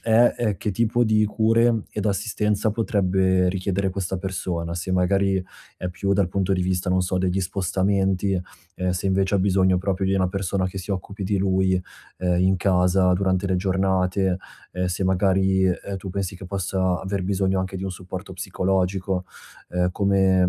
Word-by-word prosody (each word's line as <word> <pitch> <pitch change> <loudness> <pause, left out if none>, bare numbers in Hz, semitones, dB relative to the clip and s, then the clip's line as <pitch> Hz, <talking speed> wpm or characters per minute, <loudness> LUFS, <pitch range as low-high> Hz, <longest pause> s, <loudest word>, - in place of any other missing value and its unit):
è 115 +1 +4
ehm, 105 -5 0
che 105 - -2
tipo 115 +4 +1
di 110 -2 +3
cure 115 +1 +2
ed 105 0 -3
assistenza 105 +1 0
potrebbe 95 -4 +2
richiedere 95 +1 -1
questa 95 0 -3
persona. 90 -3 -3
Se, 90 +2 -3
magari, 95 +1 +2 0.3
è 90 - -4
più 95 +2 -1
dal 100 -2 +2
punto 95 +1 0
di 90 -1 +1
vista, 90 0 -1
non 95 0 +3
so, 90 +1 -1
degli 95 +1 0
spostamenti, 95 +1 0 0.4
uhm, 90 0 -1
se, 90 +2 -2
invece, 95 +1 +1
ha - - +1
bisogno 95 -1 +3
proprio 95 0 -1
di 95 - +1
una 95 -1 +2
persona 95 0 -1
che 95 +1 -5
si 95 +2 -7
occupi 100 +1 -4
di 100 +1 0
lui, 95 -1 +2 0.4
uhm, 90 -1 +1
in 95 +1 +3
casa 90 0 +3
durante 95 0 0
le 95 -1 +1
giornate, 95 0 +1 0.4
ehm, 90 +1 -1
se 90 +2 -2
magari, 95 0 +2
uhm, 95 +2 -2
tu 95 0 -7
pensi 95 0 -3
che 95 - -10
possa 95 -1 -1
aver 95 0 -3
bisogno 95 0 0
anche 95 +1 -4
di 95 - -5
un 95 - -2
supporto 95 +1 -8
psicologico, 95 0 -1 0.5
ehm, 90 0 +1
come 95 -2 +3
95 Hz, 180 wpm, -23 LUFS, 90-100 Hz, 0.5 s, è